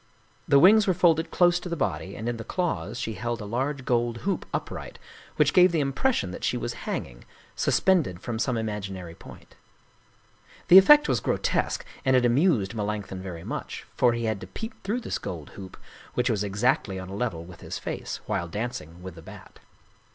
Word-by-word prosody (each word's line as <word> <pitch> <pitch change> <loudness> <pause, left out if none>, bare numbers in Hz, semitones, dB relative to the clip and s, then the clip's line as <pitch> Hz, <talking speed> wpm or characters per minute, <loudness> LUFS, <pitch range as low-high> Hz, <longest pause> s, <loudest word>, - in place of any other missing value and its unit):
The 140 - +5
wings 205 +8 +7
were 185 - +3
folded 165 -2 +3
close 175 -1 +3
to 180 - -7
the 170 - -2
body, 95 - -2
and 110 - -5
in 120 -1 -2
the 115 - -6
claws 120 - -2
she 110 - -3
held 120 +4 -3
a 105 - -6
large 130 +5 -2
gold 120 -1 +1
hoop 195 - -1
upright, - - -5 0.4
which - - +3
gave 180 0 +6
the 165 - +1
impres 230 - +1
sion 95 - -2
that - - -8
she - - 0
was - - -3 0.2
hanging, - - -5 0.3
suspended 160 - +2
from 115 +2 -4
some 125 0 0
imaginary 100 -6 -4
point. - - -14 1.2
The 185 - +12
effect 295 +9 +7
was - - +1
grotesque, - - -1 0.2
and 130 -1 +3
it 125 -1 +4
amused 120 - +2
Melanch 105 -1 -2
thon 95 - -6
very 90 -3 -7
much, - - -6
for 120 -2 +4
he 115 0 -3
had 110 -3 -1
to - - -8
peep 225 +1 -7
through 225 +5 -2
this - - -3
gold 80 -5 -7
hoop, 95 -2 -10 0.4
which 125 0 +1
was 105 -2 0
exactly 105 +1 0
on 95 0 -7
a 95 - -6
level 100 -7 -3
with 85 -1 -13
his - - -5
face, - - -5
while 85 - -2
dancing 90 -4 -5
with 95 -1 -7
the 80 - -12
Bat. - - -13
115 Hz, 200 wpm, -26 LUFS, 95-160 Hz, 1.2 s, The